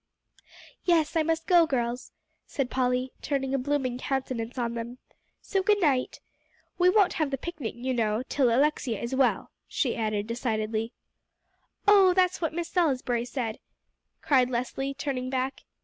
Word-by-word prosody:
"Yes, 330 -3 +2
I 325 - +4
must 325 +1 -1
go, 345 -3 +5
girls," 245 -3 -2 0.4
said 270 -3 -2
Polly, 255 0 0
turning 270 -2 -2
a 275 - +1
blooming 255 -2 -1
countenance 255 -3 -3
on 235 -1 -1
them; 235 +1 -6 0.5
"so 390 - 0
good 415 +2 +3
night. 275 -8 +1 0.6
We 360 +1 +6
won't 395 -1 +4
have 305 - +1
the 270 - -2
picnic, 305 -5 -5
you 255 +2 -2
know, 220 -1 0
till 265 -4 +2
Alexia 260 -2 +1
is 235 +2 -4
well," 260 -1 +1 0.2
she 255 -6 -1
added 215 -2 -1
decidedly. 225 -1 -2 1.0
"Oh, 390 -3 +6
that's 365 -1 +2
what 325 - 0
Miss 340 +1 -4
Salisbury 255 -9 +1
said," 240 -4 -4 0.6
cried 255 -3 +3
Leslie, 255 +3 -3
turning 265 -3 -3
back. 260 +1 -3
260 Hz, 150 wpm, -27 LUFS, 240-310 Hz, 1.0 s, We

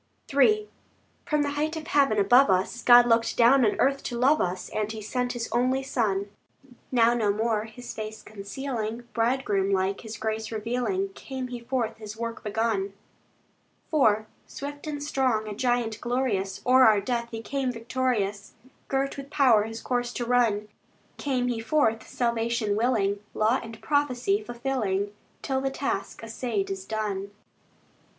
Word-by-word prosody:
III 425 +10 +4 0.6
From 300 -3 +2
the 285 - -1
height 305 +3 -1
of 310 - -6
heaven 275 -8 +3
above 245 +6 +5
us, 190 +6 +1
God 240 0 +8
looked 230 -1 +2
down 250 +3 +6
on 215 - +1
earth 275 +1 +2
to 240 - -3
love 275 +5 +4
us, 180 +1 -2
And 215 0 -2
He 220 - -6
sent 245 +4 -2
His 235 -2 -3
only 255 +3 +1
Son. 205 -6 -1 0.6
Now 235 -2 +4
no 220 -4 +2
more 215 0 0
His 225 +3 -9
face 215 0 -7
concealing, 225 +2 -5
Bridegroom 225 -5 +1
like, 190 0 0
His 220 -1 -7
grace 220 0 -3
revealing, 250 - -1
Came 265 -9 -6
He 245 -1 -5
forth 235 -2 -2
His 215 -1 -8
work 230 0 -5
begun. 210 -2 -1 1.0
IV 220 -8 +4 0.2
Swift 285 +2 -7
and 290 -1 -4
strong, 255 -7 0
a 210 - -4
giant 240 -1 0
glorious, 240 -6 -1
O'er 255 +1 +6
our 215 -4 +6
death 235 +3 -2
He 225 -1 -6
came 270 -1 -1
victorious, 230 -4 -2 0.3
Girt 275 +1 -1
with 275 0 -8
power 250 -8 +4
His 225 +1 -7
course 245 -1 -1
to 240 - -3
run. 230 -4 +2 0.5
Came 255 -3 -1
he 240 -2 -1
forth 225 -2 +1
salvation 235 -3 0
willing, 210 -3 +1 0.2
Law 220 +5 +2
and 225 -1 -9
prophecy 290 - +1
fulfilling, 235 - -2 0.3
Till 265 -1 -1
the 270 - 0
task 270 -6 -3
assayed 225 -3 -2
is 190 -1 -5
done. 205 -2 -3
235 Hz, 160 wpm, -26 LUFS, 215-260 Hz, 1.0 s, God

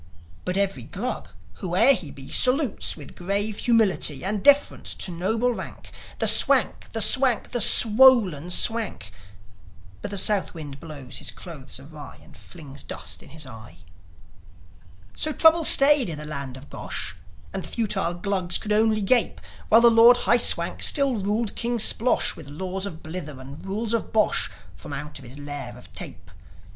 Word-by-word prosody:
But 180 +1 -3
every 195 -1 -2
Glug, 230 +4 -6 0.3
whoe'er 185 +9 +4
he 175 - -4
be, 135 -1 -12
Salutes, 255 - +1
with 145 -3 -13
grave 200 +3 0
humility 210 - +1
And 205 +1 -1
deference 285 0 +2
to 185 - -3
noble 220 +8 -2
rank, - - -10 0.3
The - - -1
Swank, - - +3
the - - -1
Swank, 260 -4 +2
the 240 - -1
swollen 215 - +4
Swank; 205 - 0 0.9
But - - -6
the 200 - -6
South 195 -1 +2
wind 145 -4 -10
blows 140 -5 -10
his - - -5
clothes 150 -8 -11
awry, 145 +1 -13
And - - -19
flings 145 -5 -12
dust - - -7
in - - -17
his 155 +1 -8
eye. 115 -7 -13 1.4
So 310 - -3
trouble 320 +2 +3
stayed 280 -6 +8
in 155 - -6
the 150 - -9
land 140 -4 -7
of 135 +2 -15
Gosh; 90 - -6 0.4
And - - -4
the - - -7
futile 195 -6 -2
Glugs 185 -1 -2
could 210 - -7
only 215 0 +1
gape, 240 +4 0 0.3
While 225 +2 +5
the 235 0 +5
Lord 230 +2 +6
High 240 - +3
Swank - - +1
still 275 -5 +2
ruled 210 +2 -3
King 240 0 -2
Splosh 230 +2 +2
With 155 - -12
laws 185 +6 -6
of 160 -5 -11
blither 155 -4 -8
and 135 +3 -12
rules 210 +4 -4
of 230 - -3
bosh, 215 -1 0 0.3
From 145 - -11
out 150 +1 -8
his 130 0 -13
lair 145 0 -8
of - - -17
tape. 85 -1 -10
195 Hz, 165 wpm, -23 LUFS, 150-230 Hz, 1.4 s, stayed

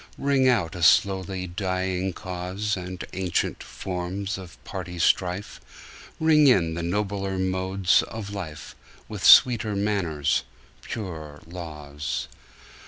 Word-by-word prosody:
Ring 140 -2 +2
out 100 -11 +2
a 90 - -6
slowly 95 +1 +3
dying 95 +1 -2
cause, 95 +4 -3
And 90 -1 -6
ancient 95 -2 -1
forms 95 +2 -4
of 90 -3 -11
party 90 0 -6
strife; 90 +3 0 0.6
Ring 155 -2 +5
in 85 -10 +4
the 85 - -3
nobler 95 +2 -2
modes 95 0 +2
of 105 -3 -7
life, 80 -7 -7 0.3
With 105 -4 -7
sweeter 115 -1 +7
manners, 95 -8 0 0.4
purer 80 -9 -6
laws. 75 -4 -5
95 Hz, 110 wpm, -25 LUFS, 90-100 Hz, 0.6 s, sweeter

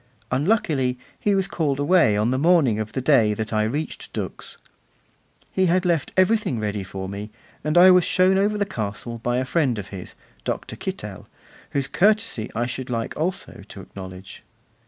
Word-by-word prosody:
Unluckily, 135 - +1 0.2
he 205 -1 +2
was 195 -1 +1
called 145 -5 -1
away 145 - +4
on 110 +3 +1
the 130 - 0
morning 150 -9 +4
of 110 0 -4
the 130 - -2
day 115 -7 +4
that 110 +1 -4
I 110 - +2
reached 140 +9 -3
Dux. - - -6 0.9
He 190 -1 +2
had 180 +2 +2
left 165 -5 +1
everything 185 - +2
ready 105 -2 -2
for 95 0 -6
me, 100 +2 -6 0.3
and 155 +3 0
I 185 +1 +9
was 180 -1 +6
shown 185 +2 +3
over 205 +2 +2
the 200 - +1
castle 115 - -5
by 120 +2 -1
a 130 - 0
friend 135 -5 +1
of 100 -2 -6
his, 95 -3 -9 0.3
Dr. - - -4
Kittel, - - -6 0.5
whose 140 -2 0
courtesy 210 - +2
I 120 +2 0
should 130 +1 -5
like 115 -2 -3
also 180 - -3
to 100 - -9
acknowledge. 95 0 -10
130 Hz, 180 wpm, -23 LUFS, 110-180 Hz, 0.9 s, I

